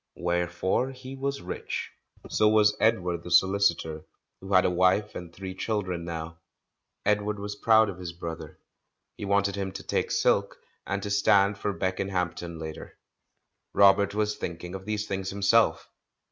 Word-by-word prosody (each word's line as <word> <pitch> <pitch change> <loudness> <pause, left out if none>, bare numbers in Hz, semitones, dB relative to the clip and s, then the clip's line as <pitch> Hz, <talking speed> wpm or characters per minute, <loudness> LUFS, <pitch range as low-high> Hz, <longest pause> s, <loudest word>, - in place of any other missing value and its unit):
Wherefore 85 +7 0
he 130 +1 -9
was 140 -2 -3
rich. 90 - -5 0.4
So 105 - +3
was 105 -1 +4
Edward 90 -6 +1
the 90 - -9
so 85 +2 +6
licitor, 85 -5 0 0.4
who 95 +1 -9
had 95 -1 +5
a - - +4
wife 95 +4 +2
and 85 -2 -8
three 95 +1 -7
children 95 -3 -2
now. 80 -1 -6 0.7
Edward 105 0 +1
was 105 0 -5
proud 110 +1 +4
of 95 -3 -6
his 90 -2 -5
brother; 85 -2 -7 0.6
he - - -6
wanted 100 0 +1
him 100 -1 -3
to - - -7
take - - -1
silk, - - +1 0.3
and 100 0 -2
to 100 - -4
stand 100 0 +3
for 105 - -1
Beckenhampton 90 -3 -2
later. 80 -1 -8 0.8
Robert 100 0 +5
was 105 0 0
thinking 85 +1 -6
of 95 0 -7
these 105 0 -2
things 95 -2 -3
him 100 0 -6
self. 115 +3 +3
95 Hz, 160 wpm, -27 LUFS, 90-105 Hz, 0.8 s, so